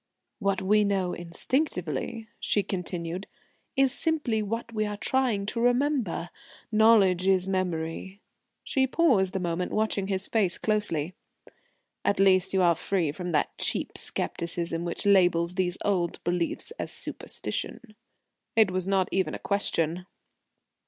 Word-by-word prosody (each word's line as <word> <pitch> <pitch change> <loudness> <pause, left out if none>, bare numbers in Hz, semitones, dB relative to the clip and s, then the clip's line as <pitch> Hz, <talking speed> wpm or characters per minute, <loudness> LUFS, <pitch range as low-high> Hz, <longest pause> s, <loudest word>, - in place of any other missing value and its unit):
"What 195 -3 0
we 210 +2 +4
know 195 -3 0
instinctively," 185 - -2
she 205 - +1
continued, 180 -1 -4 0.5
"is 270 -1 +4
simply 285 -9 0
what 230 +2 -4
we 215 -1 0
are 205 0 -4
trying 240 -4 +1
to 220 +3 -3
remember. 245 - +1 0.4
Knowledge 210 -5 +4
is 190 -1 +3
memory." 185 0 -3 0.4
She 265 -1 +1
paused 240 - +2
a - - +1
moment 175 0 -2
watching 215 -2 0
his 190 -1 -1
face 195 -6 +1
closely. 185 -7 0 0.9
"At 200 - +1
least, 190 -1 +4
you 190 -1 +2
are 170 -1 +5
free 170 -1 -1
from 180 +4 -6
that 150 - 0
cheap - - 0
scepticism 170 0 -1
which 170 +4 -2
labels 175 -3 +4
these 180 -1 0
old 180 -4 0
beliefs 175 - 0
as - - -3
superstition." 215 -4 -4 0.6
It 220 -4 +5
was 185 0 -1
not 195 -1 +2
even 190 -1 0
a - - -4
question. 180 -3 -1
190 Hz, 135 wpm, -27 LUFS, 175-215 Hz, 0.9 s, are